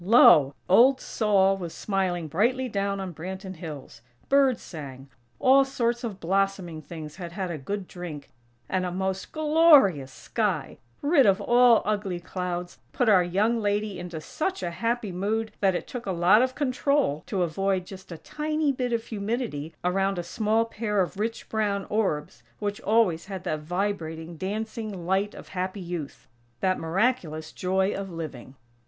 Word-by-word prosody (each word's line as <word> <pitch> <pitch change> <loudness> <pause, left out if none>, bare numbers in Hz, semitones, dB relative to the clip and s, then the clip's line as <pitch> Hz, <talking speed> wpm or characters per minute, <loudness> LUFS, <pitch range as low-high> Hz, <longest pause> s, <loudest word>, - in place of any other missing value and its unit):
Lo!! 155 - +7
Old 250 +8 +6
Sol 195 -5 +2
was 175 -3 -6
smiling 185 -4 -1
brightly 240 - +1
down 200 -3 -1
on 190 -2 -5
Branton 190 +3 -7
Hills; 150 -8 -9 0.3
birds 275 -3 +4
sang; 140 -5 -9 0.3
all 270 +1 +6
sorts 240 -2 -1
of 210 -5 -4
blossoming 190 -2 -1
things 155 0 -9
had 175 -2 -7
had 185 -2 -3
a 165 - -4
good 195 +7 -4
drink; 155 -7 -8 0.4
and 185 -1 0
a 180 - -2
most 190 +1 -3
glorious 300 - +5
sky, 190 - -2 0.2
rid 285 -4 +5
of 195 0 +4
all 240 +2 +5
ugly 205 -4 -1
clouds, 175 0 -5
put 245 -4 +1
our 190 -4 +6
young 205 +7 +1
lady 205 -1 -1
into 175 -2 -6
such 310 - -3
a 175 - -2
happy 230 +2 -2
mood 215 +5 -1
that 190 -2 +2
it - - -3
took 245 -4 -7
a - - 0
lot 180 +5 +5
of 255 0 0
control 280 - +1
to 190 -4 0
avoid 185 +2 0
just 190 -1 -11
a 165 - -6
tiny 305 - -1
bit 250 -2 -2
of 230 -1 0
humidity 205 - -3
around 195 +2 +1
a 175 - -2
small 220 +5 +1
pair 215 -2 -2
of 185 +1 -3
rich, 225 +2 -3
brown 205 -3 -1
orbs 150 - -1 0.2
which 205 -1 -3
always 200 -6 +2
had 190 -2 -6
that 155 - -2
vibrating, 165 -1 -3
dancing 210 0 -4
light 195 +3 0
of - - -11
happy 185 +2 -3
youth; 170 -7 -6 0.3
that 185 +5 +1
miraculous 165 -3 -1
"joy 190 +2 0
of 195 -1 -5
living." 145 -7 -7
195 Hz, 165 wpm, -26 LUFS, 175-225 Hz, 0.4 s, Lo